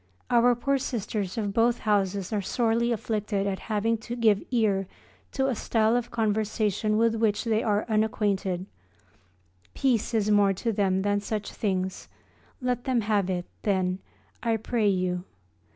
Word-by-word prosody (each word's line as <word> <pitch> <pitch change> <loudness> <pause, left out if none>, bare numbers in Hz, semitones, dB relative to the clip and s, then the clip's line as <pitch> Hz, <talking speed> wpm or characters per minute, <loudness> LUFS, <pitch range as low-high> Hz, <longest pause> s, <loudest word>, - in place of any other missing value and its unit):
Our 240 0 +5
poor 275 +3 0
Sisters 215 -5 -3
of 205 -3 -1
both 235 +2 +2
houses 200 -1 0
are 210 - +1
sorely 230 +3 +1
afflicted 210 -2 -1
at 195 -1 -2
having 220 +1 +1
to 235 +2 -6
give 220 -4 +3
ear 205 -6 +1 0.5
to 265 - +1
a 265 - +1
style 220 0 +1
of 245 -1 -1
conversation 215 -1 0
with 230 0 +3
which 220 -2 +1
they 225 -2 +1
are 210 -1 +1
unacquainted 205 -4 0 1.1
peace 240 -3 +1
is 215 -1 +2
more 200 -1 +4
to 225 +5 -2
them 190 -2 +1
than 205 0 +1
such 210 0 -4
things. 190 -3 -2 0.5
Let 250 -1 -1
them 255 -3 +2
have 205 -3 +1
it, 175 -1 -2 0.2
then, 185 -2 0 0.4
I 230 -1 +1
pray 220 0 0
you. 180 -2 0
215 Hz, 150 wpm, -27 LUFS, 200-230 Hz, 1.1 s, Our